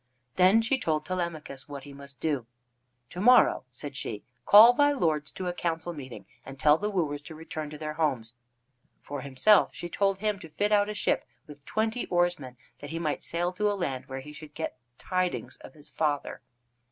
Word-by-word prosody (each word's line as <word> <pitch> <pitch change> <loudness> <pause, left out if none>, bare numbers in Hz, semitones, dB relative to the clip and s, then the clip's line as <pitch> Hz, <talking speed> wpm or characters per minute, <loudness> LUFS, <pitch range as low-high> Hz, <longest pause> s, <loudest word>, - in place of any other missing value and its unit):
Then 190 +5 +5
she 265 +4 +1
told 155 -2 -1
Telemachus 160 -7 -4
what 140 -2 -7
he 145 - -11
must 140 0 -10
do. 140 -7 -1 0.6
"To 180 - -5
morrow," 250 - +5
said 135 +3 -8
she, 110 -5 -5 0.2
"call 220 +4 +10
thy 290 +2 +4
lords 155 - 0
to 185 - -5
a 180 - -1
council 170 -1 -2
meeting, 130 -9 -9 0.2
and 135 0 -10
tell 150 +2 +5
the 210 - -1
wooers 155 -7 -1
to 160 +2 -10
return 155 -1 -6
to 150 - -8
their 155 0 -4
homes." 135 -8 -1 0.7
For 145 -1 -6
himself, 140 +11 +3
she 175 - -6
told 195 +1 +1
him 210 0 -1
to 165 - -11
fit 205 +7 -1
out 205 0 +3
a 210 - -4
ship 205 - 0 0.2
with 145 -3 -14
twenty 220 +2 -1
oars 175 -1 +1
men, 130 -3 -10 0.2
that 145 - -8
he 165 - -4
might 155 -3 -2
sail 175 +2 -1
to 210 +3 +1
a 205 - -2
land 135 -8 -3
where 135 0 -6
he 150 +2 -11
should 150 -1 -12
get 160 - -4 0.2
tidings 185 -1 -2
of - - -14
his 150 -1 -14
father. 150 -3 -2
160 Hz, 200 wpm, -28 LUFS, 145-185 Hz, 0.7 s, call